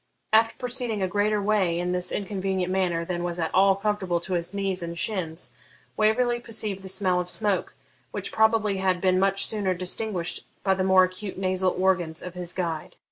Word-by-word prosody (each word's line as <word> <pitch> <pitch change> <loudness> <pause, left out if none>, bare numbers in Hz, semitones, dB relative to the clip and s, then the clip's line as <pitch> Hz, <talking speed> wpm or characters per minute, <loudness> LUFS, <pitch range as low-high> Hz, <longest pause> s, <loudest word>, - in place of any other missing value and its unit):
After 225 +1 +4
proceeding 245 -5 -3
a - - +1
greater 205 +2 +1
way 200 -4 +1
in 180 +1 -1
this 180 0 0
inconvenient 190 -2 -2
manner 175 -3 0
than 175 0 -3
was 175 -1 -2
at 165 -2 -2
all 195 0 +5
comfortable 195 -4 -1
to 185 +2 -5
his 170 0 -1
knees 195 -2 -1
and 170 0 -5
shins, 175 -4 -2 0.4
Waverley 240 +3 +2
perceived 220 -4 -3
the 190 - -5
smell 185 -2 +1
of 180 0 -3
smoke, 205 -1 -1 0.3
which - - -4
probably 220 -2 +3
had 190 -1 +1
been 185 0 +2
much 195 0 +3
sooner 200 -4 0
distinguished 185 0 -1 0.2
by 195 - +3
the 190 0 -1
more 190 0 +6
acute 185 +2 -4
nasal 185 -1 +1
organs 180 -4 +1
of 180 - -7
his 180 -1 -3
guide. 165 -4 -3
190 Hz, 190 wpm, -26 LUFS, 180-205 Hz, 0.4 s, more